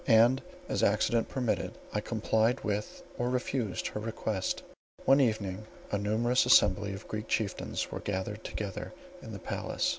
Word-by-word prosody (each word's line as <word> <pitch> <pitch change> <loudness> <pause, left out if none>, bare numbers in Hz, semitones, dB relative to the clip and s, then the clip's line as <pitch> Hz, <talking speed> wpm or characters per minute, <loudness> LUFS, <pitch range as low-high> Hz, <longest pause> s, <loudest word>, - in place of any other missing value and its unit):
And, 120 +2 +6 0.3
as - - 0
accident 110 +3 +3
permitted, 125 -4 -1 0.2
I 105 - 0
complied 110 +1 +1
with 105 0 -2 0.2
or 120 +1 +1
refused 125 -4 -1
her - - -4
request. 110 -3 -2 0.4
One 135 +2 +6
evening 110 -4 0 0.2
a 105 - +1
numerous 115 +5 +2
assembly 100 -4 +5
of 100 +2 -8
Greek 110 0 -4
chieftains 110 -3 -1
were - - -3
gathered 100 +2 -3
together 100 -3 -5 0.3
in - - -8
the - - -5
palace. - - -1
110 Hz, 150 wpm, -31 LUFS, 105-120 Hz, 0.4 s, And